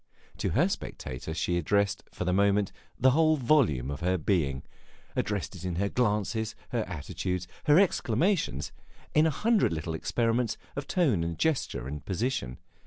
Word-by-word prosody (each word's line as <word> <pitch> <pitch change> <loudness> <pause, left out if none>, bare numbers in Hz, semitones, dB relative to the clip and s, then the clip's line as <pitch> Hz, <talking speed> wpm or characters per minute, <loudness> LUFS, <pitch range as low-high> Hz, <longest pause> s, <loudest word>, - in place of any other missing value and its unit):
To - - -1
her - - +5
spectator 65 +4 -5
she 85 +2 0
addressed, 100 +4 +1
for 90 - -4
the 90 - +1
moment, 100 0 +3 0.3
the 130 +1 +5
whole 155 +2 +4
volume 115 - +2
of 70 - -5
her 90 +2 +1
being 75 -6 0 0.5
addressed - - -2
it - - -9
in 90 -2 -2
her 100 +3 0
glances, 110 -1 0
her 120 -4 0
attitudes, 90 +2 -4 0.2
her 150 +1 +6
exclamations, 170 - +1 0.4
in 155 +1 +5
a - - +3
hundred 210 - +2
little 80 0 -3
experiments 115 +6 0 0.2
of 140 - -4
tone 135 - +2
and 85 0 -3
gesture 155 - 0
and 75 +1 -6
position. 95 - -2
100 Hz, 160 wpm, -29 LUFS, 85-130 Hz, 0.5 s, her